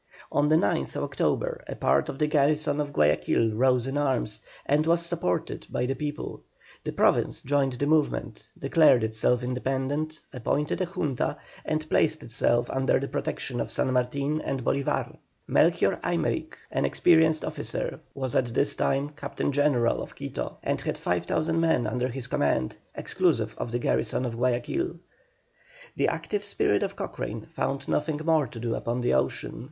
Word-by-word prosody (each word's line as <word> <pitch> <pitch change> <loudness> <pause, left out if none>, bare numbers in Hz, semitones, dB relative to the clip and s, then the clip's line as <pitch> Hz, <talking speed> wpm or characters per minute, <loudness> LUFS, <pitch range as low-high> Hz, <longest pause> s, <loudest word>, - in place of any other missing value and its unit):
On 145 +1 +3
the 155 - +4
9th 165 - +1
October - - -1
a - - -5
part - - +2
of - - -5
the 150 - +2
garrison 150 0 +2
of 145 -1 -3
Guayaquil 95 - +2
rose 125 +1 +3
in 135 +2 -1
arms, 130 -7 0 0.3
and 150 +3 +2
was 170 0 +3
supported 170 - -2
by 125 - -1
the 135 - 0
people. 145 +2 -5 0.4
The - - -3
Province - - +2
joined 140 -1 +1
the 125 +3 -1
movement, 155 0 0
declared 135 -8 +5
itself 110 +3 +1
independent, 135 +5 -2
appointed 145 +7 -1
a 185 - 0
Junta, 165 -8 -1 0.3
and 155 0 -2
placed 155 0 +2
itself 120 +1 +1
under 135 0 +2
the 140 - -3
protection 120 -3 -3
of - - -3
San 130 - 0
Martin 140 +4 0
and 130 -3 -3
Bolívar. 140 0 0 0.3
Melchor - - +3
Aymerich, - - -1 0.2
an - - 0
experienced 160 -2 +4
officer, - - -3 0.2
was 130 -3 -3
at 130 - +2
this 145 +1 +2
time 140 +2 +1
Captain 145 -1 -3
General 140 -4 +2
of - - -8
Quito, - - -5
and - - -1
had - - -2
5,000 155 - 0
men 160 -7 +2
under 125 0 0
his 130 0 -5
command, 70 - 0 0.2
exclusive - - +1
of 120 - -3
the 120 - 0
garrison 125 +1 0
of 115 -2 -3
Guayaquil. 125 - 0 1.0
The - - +2
active 205 -1 -2
spirit 105 - +1
of - - -2
Cochrane - - -5
found 140 0 -3
nothing 150 0 0
more 160 -4 +3
to 115 0 -9
do 115 0 -1
upon 120 +2 -2
the 120 - +2
ocean. 65 - -1
140 Hz, 165 wpm, -27 LUFS, 125-155 Hz, 1.0 s, declared